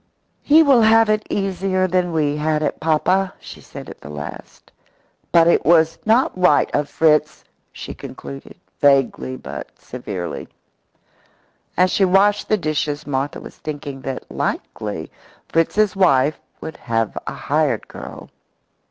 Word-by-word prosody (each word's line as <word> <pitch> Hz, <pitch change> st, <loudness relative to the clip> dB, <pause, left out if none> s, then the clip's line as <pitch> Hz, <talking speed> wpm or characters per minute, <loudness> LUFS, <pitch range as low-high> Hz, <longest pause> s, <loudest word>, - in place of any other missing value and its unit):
"He 315 Hz, +2 st, +6 dB
will 275 Hz, -5 st, +5 dB
have 225 Hz, 0 st, +5 dB
it 215 Hz, 0 st, -1 dB
easier 190 Hz, -1 st, 0 dB
than 180 Hz, -1 st, 0 dB
we 150 Hz, -3 st, +1 dB
had 155 Hz, 0 st, 0 dB
it, -, -, -2 dB
papa," 170 Hz, +5 st, +1 dB
she -, -, -11 dB
said -, -, -10 dB
at -, -, -11 dB
the 75 Hz, -, -10 dB
last. 75 Hz, 0 st, -9 dB, 0.6 s
"But 170 Hz, -1 st, +5 dB
it 170 Hz, -, +4 dB
was 160 Hz, -1 st, +4 dB
not 230 Hz, +4 st, +3 dB
right 180 Hz, -5 st, +3 dB
of 145 Hz, 0 st, 0 dB
Fritz," 155 Hz, -1 st, +2 dB, 0.3 s
she -, -, -8 dB
concluded, 70 Hz, -1 st, -10 dB, 0.2 s
vaguely 135 Hz, -2 st, +2 dB
but -, -, -9 dB
severely. 100 Hz, -8 st, -6 dB, 1.3 s
As 185 Hz, +1 st, +4 dB
she 200 Hz, -, +2 dB
washed 195 Hz, +2 st, +3 dB
the 215 Hz, -, +3 dB
dishes 150 Hz, -3 st, -2 dB
Martha 140 Hz, 0 st, -2 dB
was -, -, -12 dB
thinking 145 Hz, -3 st, -6 dB
that 135 Hz, -1 st, -5 dB
likely 105 Hz, -7 st, -4 dB, 0.4 s
Fritz's 200 Hz, +6 st, +2 dB
wife 150 Hz, -6 st, +3 dB, 0.2 s
would 160 Hz, -, -7 dB
have 115 Hz, -3 st, -2 dB
a -, -, -3 dB
hired -, -, 0 dB
girl. -, -, -10 dB
160 Hz, 140 wpm, -20 LUFS, 140-190 Hz, 1.3 s, He